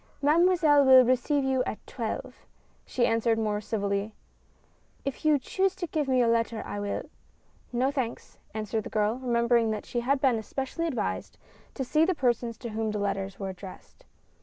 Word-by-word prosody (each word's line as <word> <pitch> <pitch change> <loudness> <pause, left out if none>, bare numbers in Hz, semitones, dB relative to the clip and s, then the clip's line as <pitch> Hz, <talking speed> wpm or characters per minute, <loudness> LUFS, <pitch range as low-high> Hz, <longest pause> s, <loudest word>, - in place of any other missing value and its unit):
"Mademoiselle 310 -1 +4
will 260 -1 +8
receive 255 +3 +2
you 265 -1 +1
at - - -3
twelve," 230 -4 -6 0.4
she 240 - +1
answered 230 0 +2
more 210 -2 -1
civilly. 200 0 -2 0.4
" - - -37
If 275 - -4
you 305 -1 +4
choose 380 +7 0
to 355 - -3
give 310 -4 -2
me 260 -1 +2
your 245 -2 +4
letter 230 -1 0
I 205 - -5
will 205 0 -3 0.4
" - - -39 0.3
"No, 250 +3 +1
thanks," 255 -5 -4
answered 215 0 -3
the - - -5
girl, 215 +3 0
remembering 235 -2 +2
that 215 -1 -3
she 240 - -2
had 270 +4 +1
been 260 -4 +2
especially 270 +9 -3
advised 95 - -3 0.4
to 265 - -2
see 305 +5 +2
the 365 +2 +2
persons 240 -4 0
to 235 - -6
whom 220 0 -2
her 210 - -2
letters 195 -1 -2
were 195 -1 -3
addressed. 190 - -11
240 Hz, 185 wpm, -28 LUFS, 215-275 Hz, 0.4 s, will